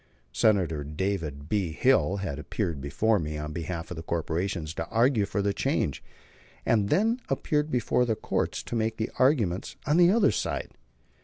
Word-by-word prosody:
Senator 85 Hz, -, +2 dB
David 75 Hz, -2 st, -3 dB
B. 95 Hz, -4 st, 0 dB
Hill 100 Hz, -2 st, +3 dB
had 85 Hz, -8 st, -4 dB
appeared 85 Hz, -2 st, -3 dB
before 105 Hz, +11 st, +1 dB
me 75 Hz, -1 st, -4 dB
on 75 Hz, 0 st, -5 dB
behalf 85 Hz, 0 st, -5 dB
of 90 Hz, -, -5 dB
the -, -, -4 dB
corporations 85 Hz, 0 st, -2 dB
to -, -, -4 dB
argue 115 Hz, -3 st, +3 dB
for 100 Hz, -, -1 dB
the 100 Hz, 0 st, +1 dB
change; 70 Hz, -7 st, -1 dB, 0.6 s
and 105 Hz, -3 st, +3 dB
he -, -, +4 dB
then 225 Hz, +5 st, +1 dB
appeared 150 Hz, -2 st, 0 dB
before 125 Hz, -1 st, +1 dB
the 115 Hz, -2 st, 0 dB
courts -, -, -2 dB
to -, -, -5 dB
make 110 Hz, 0 st, 0 dB
the 110 Hz, +1 st, -2 dB
argument 115 Hz, -, +2 dB
on 150 Hz, +3 st, +2 dB
the 175 Hz, 0 st, +7 dB
other 205 Hz, +1 st, +4 dB
side. -, -, -2 dB
100 Hz, 175 wpm, -27 LUFS, 80-115 Hz, 0.6 s, the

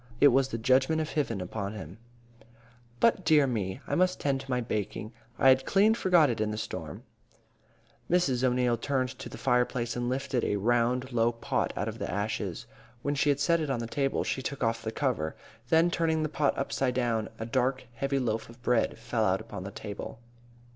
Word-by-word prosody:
It 145 Hz, -, +8 dB
was 135 Hz, +1 st, +3 dB
the 115 Hz, -, -4 dB
judgment 130 Hz, +7 st, +3 dB
of 155 Hz, -1 st, -2 dB
Hiven 125 Hz, -9 st, -1 dB
upon 100 Hz, +2 st, -4 dB
him. 95 Hz, -1 st, -9 dB, 1.0 s
"But, 225 Hz, -5 st, +3 dB
dear 155 Hz, -3 st, +5 dB
me! 110 Hz, -2 st, -2 dB
I -, -, -4 dB
must 185 Hz, 0 st, +2 dB
tend 135 Hz, -2 st, 0 dB
to 135 Hz, -, -13 dB
my 125 Hz, -1 st, +1 dB
baking. 110 Hz, -1 st, -3 dB, 0.2 s
I 135 Hz, -, +5 dB
had 130 Hz, 0 st, +5 dB
clean 205 Hz, +3 st, +4 dB
forgot 180 Hz, -8 st, +4 dB
it 115 Hz, -4 st, -1 dB
in 110 Hz, -, +1 dB
the 105 Hz, -, -3 dB
storm." 80 Hz, -8 st, -6 dB, 1.1 s
Mrs. 140 Hz, -8 st, +2 dB
O'Neil 125 Hz, -1 st, +2 dB
turned 130 Hz, +1 st, -1 dB
to -, -, -8 dB
the -, -, -9 dB
fireplace 125 Hz, -1 st, +1 dB
and 120 Hz, 0 st, -1 dB
lifted 130 Hz, -1 st, -1 dB
a -, -, +1 dB
round, 120 Hz, +4 st, +1 dB
low 120 Hz, -1 st, +2 dB
pot 115 Hz, -, -1 dB
out -, -, -1 dB
of -, -, -5 dB
the -, -, -3 dB
ashes. -, -, -3 dB, 0.4 s
When 145 Hz, -, 0 dB
she 145 Hz, +1 st, +1 dB
had 140 Hz, -1 st, +2 dB
set 170 Hz, +4 st, +3 dB
it 155 Hz, -2 st, -2 dB
on 135 Hz, -, 0 dB
the 115 Hz, -, -3 dB
table, 135 Hz, +3 st, 0 dB
she 130 Hz, -, -2 dB
took 135 Hz, 0 st, -4 dB
off 115 Hz, 0 st, 0 dB
the 110 Hz, 0 st, -3 dB
cover. 115 Hz, -, -1 dB, 0.3 s
Then, 165 Hz, +3 st, +4 dB
turning 160 Hz, -2 st, +1 dB
the 155 Hz, -, -1 dB
pot 145 Hz, -1 st, 0 dB
upside 135 Hz, -2 st, -1 dB
down, 115 Hz, -3 st, 0 dB
a 110 Hz, -, -4 dB
dark, 130 Hz, +2 st, 0 dB
heavy 135 Hz, +3 st, -1 dB
loaf 115 Hz, -4 st, -1 dB
of 115 Hz, +1 st, -14 dB
bread 120 Hz, -2 st, +1 dB
fell 115 Hz, -2 st, -1 dB
out 95 Hz, -2 st, +2 dB
upon 90 Hz, -, -8 dB
the -, -, -4 dB
table. 105 Hz, +1 st, -7 dB
125 Hz, 205 wpm, -29 LUFS, 115-140 Hz, 1.1 s, It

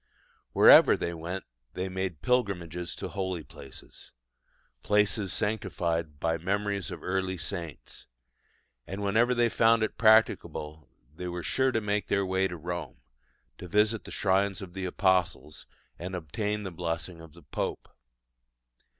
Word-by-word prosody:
Wherever -, -, +8 dB
they 85 Hz, -, -3 dB
went 85 Hz, +3 st, -5 dB, 0.3 s
they 95 Hz, +1 st, -3 dB
made 95 Hz, -4 st, -4 dB
pilgrimages 90 Hz, -8 st, -1 dB
to -, -, -6 dB
holy 95 Hz, -4 st, -3 dB
places 70 Hz, -, -13 dB, 0.7 s
places 105 Hz, -, +2 dB
sanctified 85 Hz, -7 st, -2 dB
by 80 Hz, +1 st, 0 dB
memories 100 Hz, +2 st, -1 dB
of 90 Hz, -4 st, -8 dB
early 95 Hz, 0 st, -1 dB
saints 85 Hz, -3 st, -6 dB, 0.8 s
and 95 Hz, +2 st, -5 dB
whenever 115 Hz, +5 st, +3 dB
they 120 Hz, 0 st, +3 dB
found 115 Hz, 0 st, +3 dB
it 110 Hz, -, -3 dB
practicable 95 Hz, -8 st, +2 dB, 0.3 s
they 90 Hz, +2 st, -5 dB
were 90 Hz, 0 st, -4 dB
sure 130 Hz, 0 st, +2 dB
to 115 Hz, -, 0 dB
make 105 Hz, -1 st, -1 dB
their 100 Hz, -1 st, +1 dB
way 95 Hz, +1 st, +1 dB
to 90 Hz, -, -7 dB
Rome, 85 Hz, -6 st, -5 dB, 0.6 s
to 90 Hz, -, -8 dB
visit 105 Hz, +4 st, +2 dB
the -, -, -8 dB
shrines 100 Hz, 0 st, +1 dB
of 95 Hz, -4 st, -9 dB
the 95 Hz, 0 st, -4 dB
apostles, 90 Hz, -6 st, 0 dB, 0.3 s
and 90 Hz, +2 st, -5 dB
obtain 105 Hz, +6 st, -3 dB
the 95 Hz, -, -5 dB
blessing 85 Hz, 0 st, -4 dB
of 80 Hz, -2 st, -13 dB
the 85 Hz, -1 st, -16 dB
Pope. -, -, -4 dB
95 Hz, 140 wpm, -28 LUFS, 85-105 Hz, 0.8 s, Wherever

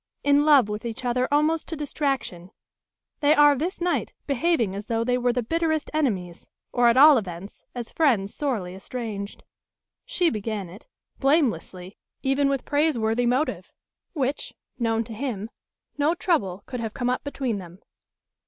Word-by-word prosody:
In 285 Hz, +1 st, +4 dB
love 285 Hz, -7 st, +6 dB
with 210 Hz, +2 st, -5 dB
each 235 Hz, +2 st, -5 dB
other 250 Hz, +1 st, +1 dB
almost 305 Hz, +2 st, +2 dB
to 330 Hz, -, -4 dB
distraction, 275 Hz, -, -3 dB, 0.7 s
they 295 Hz, +1 st, +4 dB
are 295 Hz, -1 st, +6 dB
this 340 Hz, +8 st, -3 dB
night 350 Hz, 0 st, -1 dB
behaving 275 Hz, -, +1 dB
as 200 Hz, +2 st, -6 dB
though 230 Hz, 0 st, 0 dB
they 250 Hz, +1 st, +1 dB
were 245 Hz, 0 st, +1 dB
the 245 Hz, 0 st, -1 dB
bitterest 320 Hz, +3 st, -1 dB
enemies, 195 Hz, -, -2 dB, 0.3 s
or 245 Hz, -1 st, +4 dB
at 235 Hz, -, +3 dB
all 290 Hz, -1 st, +8 dB
events 185 Hz, 0 st, -9 dB
as 240 Hz, -2 st, -6 dB
friends 230 Hz, -11 st, +2 dB
sorely 225 Hz, -12 st, -2 dB
estranged. 200 Hz, 0 st, -6 dB, 0.6 s
She 350 Hz, -2 st, +1 dB
began 210 Hz, -3 st, -4 dB
it; 195 Hz, +6 st, -14 dB, 0.3 s
blamelessly, 220 Hz, -, 0 dB, 0.2 s
even 275 Hz, +1 st, +2 dB
with 275 Hz, -2 st, -1 dB
praiseworthy 245 Hz, -6 st, +1 dB
motive; 255 Hz, +6 st, -1 dB, 0.4 s
which, 280 Hz, -3 st, -2 dB, 0.2 s
known 225 Hz, -1 st, +1 dB
to 230 Hz, 0 st, -9 dB
him, 225 Hz, -3 st, -4 dB, 0.5 s
no 305 Hz, +4 st, +2 dB
trouble 200 Hz, -, 0 dB
could 250 Hz, -, -6 dB
have 225 Hz, -2 st, -4 dB
come 250 Hz, -1 st, 0 dB
up 250 Hz, -, -2 dB
between 265 Hz, -7 st, -2 dB
them. 175 Hz, -1 st, -11 dB
250 Hz, 155 wpm, -25 LUFS, 215-290 Hz, 0.7 s, all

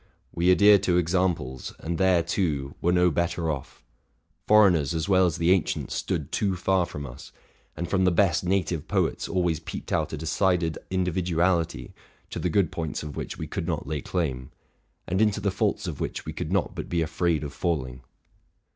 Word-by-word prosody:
We 85 Hz, +2 st, +2 dB
adhere 100 Hz, +2 st, +7 dB
to 90 Hz, -2 st, +1 dB
examples, 85 Hz, -7 st, -1 dB
and 85 Hz, 0 st, -4 dB
there, 95 Hz, -3 st, +4 dB
too, 75 Hz, -6 st, -1 dB
were 85 Hz, -, +2 dB
no 90 Hz, 0 st, +4 dB
better 85 Hz, 0 st, 0 dB
off; 70 Hz, -3 st, -7 dB, 0.6 s
foreigners 90 Hz, -8 st, +5 dB
as 80 Hz, 0 st, -1 dB
well 95 Hz, -2 st, +4 dB
as 85 Hz, -, -2 dB
the 85 Hz, +1 st, +2 dB
ancients 95 Hz, -3 st, 0 dB
stood -, -, -3 dB
too 100 Hz, -2 st, 0 dB
far 90 Hz, -1 st, +1 dB
from 70 Hz, -1 st, -6 dB
us; 60 Hz, 0 st, -10 dB, 0.5 s
and 85 Hz, +2 st, -3 dB
from 95 Hz, +1 st, +1 dB
the 90 Hz, -, +4 dB
best 95 Hz, +1 st, +2 dB
native 90 Hz, -4 st, -1 dB
poets -, -, 0 dB
always 90 Hz, -4 st, 0 dB
peeped -, -, -7 dB
out -, -, 0 dB
a 80 Hz, -, -4 dB
decided 85 Hz, +1 st, 0 dB
individuality, 90 Hz, -2 st, 0 dB, 0.4 s
to -, -, -4 dB
the 90 Hz, -, 0 dB
good 90 Hz, -1 st, +2 dB
points 80 Hz, -2 st, -4 dB
of 75 Hz, -1 st, -7 dB
which -, -, -5 dB
we -, -, -4 dB
could -, -, -4 dB
not -, -, -2 dB
lay 75 Hz, -2 st, -3 dB
claim, 65 Hz, -8 st, -2 dB, 0.6 s
and 95 Hz, +4 st, 0 dB
into 105 Hz, -1 st, +2 dB
the 100 Hz, -1 st, 0 dB
faults 100 Hz, 0 st, -1 dB
of 85 Hz, -6 st, -5 dB
which -, -, -4 dB
we -, -, -5 dB
could -, -, -4 dB
not -, -, 0 dB
but -, -, -6 dB
be 85 Hz, -1 st, +1 dB
afraid 80 Hz, 0 st, 0 dB
of 70 Hz, 0 st, -6 dB
falling. 65 Hz, -9 st, -2 dB
85 Hz, 190 wpm, -26 LUFS, 80-95 Hz, 0.6 s, adhere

